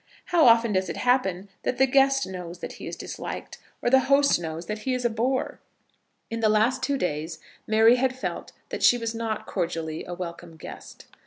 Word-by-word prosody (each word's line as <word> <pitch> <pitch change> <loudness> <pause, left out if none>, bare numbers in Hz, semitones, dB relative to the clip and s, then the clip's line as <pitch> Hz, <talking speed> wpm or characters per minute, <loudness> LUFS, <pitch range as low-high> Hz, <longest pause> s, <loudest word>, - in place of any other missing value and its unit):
How 345 -7 +4
often 230 -1 +5
does 185 0 0
it - - -4
happen 205 -7 +1
that 250 - -2
the 265 - +5
guest 270 +1 +3
knows 180 -2 -7
that - - -7
he - - -6
is - - -5
disliked, - - -7 0.2
or 240 - +1
the 265 - +7
host 280 -6 +4
knows 165 0 -5
that 210 +4 -4
he 255 +4 -1
is 250 -1 -3
a 240 - +2
bore! 250 +4 -1 0.7
In 230 - -2
the 220 -1 +3
last 220 +5 +2
two 280 -1 0
days 160 - -3 0.3
Mary 225 +3 +5
had 255 0 0
felt - - -5 0.2
that - - -5
she 245 - +6
was 230 -1 -3
not 225 -2 -3
cordially 160 -2 -3
a 175 - -6
welcome 170 -2 -8
guest. - - -11
225 Hz, 200 wpm, -26 LUFS, 180-255 Hz, 0.7 s, the